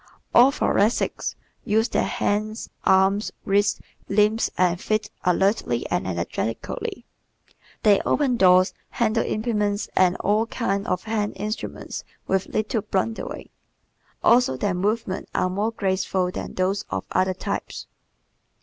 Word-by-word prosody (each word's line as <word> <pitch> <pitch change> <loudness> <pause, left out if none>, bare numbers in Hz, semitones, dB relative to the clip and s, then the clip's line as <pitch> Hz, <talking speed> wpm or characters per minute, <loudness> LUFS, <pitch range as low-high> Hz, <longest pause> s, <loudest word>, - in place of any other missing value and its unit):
All 250 +3 +7
Thoracics 220 -5 0 0.3
use 220 +2 +2
their - - +1
hands, 215 -2 -2
arms, 190 +2 +3
wrists, 200 +1 +2 0.3
limbs 210 +3 +3
and 180 -1 +2
feet 215 0 -1
alertly 195 +4 +1
and - - 0
energetically. - - -3 0.8
They 205 -3 +5
open 275 -4 +1
doors, 185 -3 +5 0.2
handle 225 -1 +1
implements 210 -2 -1
and 185 -1 +4
all 215 +3 +1
kinds 200 -4 -2
of 180 -1 -1
hand 215 -2 -1
instruments 215 +2 -5 0.2
with 190 0 0
little 215 +1 -1
blundering. 200 +4 -3 0.7
Also 240 - +4
their 195 +8 0
movements 200 +2 -2
are 185 - +1
more 205 +4 0
graceful 190 -3 0
than - - -6
those 190 +2 0
of 95 0 -3
other 185 0 +1
types. - - -4
205 Hz, 120 wpm, -24 LUFS, 190-220 Hz, 0.8 s, All